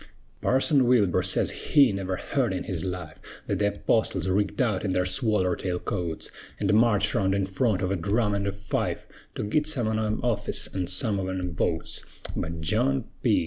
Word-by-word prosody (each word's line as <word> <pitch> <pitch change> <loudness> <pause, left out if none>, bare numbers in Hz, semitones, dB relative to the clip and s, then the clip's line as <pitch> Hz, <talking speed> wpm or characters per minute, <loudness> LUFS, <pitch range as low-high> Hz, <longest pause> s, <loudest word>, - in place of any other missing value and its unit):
Parson 135 0 +4
Wilbur 110 -8 +3
sez - - +1
he 140 -5 +4
never 95 -1 -2
heerd 125 +1 -1
in 90 - -3
his 85 -4 -3
life 90 -4 -5 0.3
Thet 100 - -1
th' 100 0 0
Apostles 95 -5 +1
rigged 100 +2 0
out 110 -7 +1
in 95 -3 0
their 90 0 +1
swaller 95 -1 +1
tail 90 -2 -2
coats, 85 -2 -4 0.3
An' 100 - +2
marched 105 -2 +3
round 95 0 +1
in 100 -1 +1
front 95 +1 0
of 95 - 0
a - - +1
drum 105 +4 0
an' 100 0 -1
a - - 0
fife, 100 +1 -3 0.3
To - - -3
git 150 +9 0
some 130 -8 0
on 110 0 0
'em 110 0 -1
office, 120 -3 0
an' 95 -2 -2
some 100 +2 +1
on 95 0 -3
'em 90 -1 -4
votes; 80 0 -2 0.3
But 85 0 -4
John 70 -3 +1 0.2
P. - - +3
100 Hz, 195 wpm, -26 LUFS, 90-110 Hz, 0.3 s, Parson